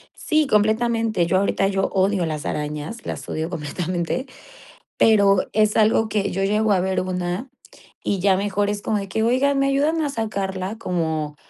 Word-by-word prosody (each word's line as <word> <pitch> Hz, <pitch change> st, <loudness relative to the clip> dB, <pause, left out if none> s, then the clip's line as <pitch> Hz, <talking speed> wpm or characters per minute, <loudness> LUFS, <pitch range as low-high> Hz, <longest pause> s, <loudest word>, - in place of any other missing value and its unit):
Sí, 310 Hz, -1 st, +1 dB
completamente. 220 Hz, -2 st, +2 dB
Yo 185 Hz, +2 st, +2 dB
ahorita, 195 Hz, 0 st, +1 dB
yo 195 Hz, 0 st, 0 dB
odio 190 Hz, -1 st, +1 dB
las 155 Hz, -2 st, -4 dB
arañas, 150 Hz, +9 st, -4 dB
las -, -, -5 dB
odio 160 Hz, +1 st, -3 dB
completamente, 175 Hz, -, -3 dB, 0.7 s
pero 200 Hz, -3 st, +4 dB
es 215 Hz, 0 st, +2 dB
algo 220 Hz, 0 st, +3 dB
que 205 Hz, -2 st, -1 dB
yo 195 Hz, -, -2 dB
llego 210 Hz, +2 st, +2 dB
a 190 Hz, -, +3 dB
ver 190 Hz, +1 st, 0 dB
una, 180 Hz, +6 st, -3 dB, 0.5 s
y 200 Hz, -, -1 dB
ya 190 Hz, 0 st, +3 dB
mejor 205 Hz, 0 st, 0 dB
es 205 Hz, 0 st, -3 dB
como 215 Hz, +1 st, -1 dB
de 200 Hz, -1 st, -4 dB
que 220 Hz, +3 st, -1 dB
oiga 260 Hz, +5 st, +2 dB
me 275 Hz, 0 st, +2 dB
ayudan 295 Hz, +4 st, +1 dB
a 295 Hz, -, 0 dB
sacarla 200 Hz, -5 st, -3 dB
como 160 Hz, -6 st, -2 dB
200 Hz, 170 wpm, -22 LUFS, 180-220 Hz, 0.7 s, pero